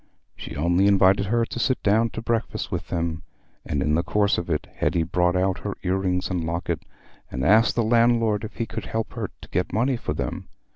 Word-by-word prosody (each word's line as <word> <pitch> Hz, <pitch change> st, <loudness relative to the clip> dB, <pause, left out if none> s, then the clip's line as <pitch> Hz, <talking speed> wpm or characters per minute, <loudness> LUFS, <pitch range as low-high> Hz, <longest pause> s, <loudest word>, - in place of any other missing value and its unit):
She -, -, -8 dB
only 85 Hz, +6 st, +2 dB
invited 100 Hz, 0 st, +4 dB
her 115 Hz, +2 st, +2 dB
to 120 Hz, -, -6 dB
sit 125 Hz, +3 st, 0 dB
down 110 Hz, +3 st, +3 dB
to 115 Hz, -, -5 dB
breakfast 115 Hz, -1 st, -2 dB
with -, -, -3 dB
them, 85 Hz, -1 st, -2 dB, 0.4 s
and 70 Hz, -2 st, -1 dB
in 75 Hz, -, +1 dB
the 80 Hz, -, +3 dB
course 100 Hz, +3 st, +1 dB
of 85 Hz, -, -6 dB
it 75 Hz, -2 st, -1 dB
Hetty 85 Hz, -, +1 dB
brought 90 Hz, +1 st, +1 dB
out 95 Hz, +1 st, +1 dB
her 100 Hz, -, -5 dB
ear 90 Hz, 0 st, +1 dB
rings 90 Hz, -1 st, -1 dB
and 90 Hz, -2 st, -1 dB
locket, 85 Hz, +2 st, -2 dB, 0.5 s
and 65 Hz, +2 st, -3 dB
asked 110 Hz, +6 st, +5 dB
the 120 Hz, -, +2 dB
landlord 115 Hz, -2 st, +3 dB
if 110 Hz, -, -7 dB
he 115 Hz, -, -2 dB
could 110 Hz, -1 st, -6 dB
help 110 Hz, 0 st, -3 dB
her -, -, -4 dB
to -, -, -12 dB
get 90 Hz, -, -1 dB
money 125 Hz, +4 st, +1 dB
for 75 Hz, -, -4 dB
them. -, -, -4 dB
95 Hz, 220 wpm, -24 LUFS, 85-115 Hz, 0.5 s, asked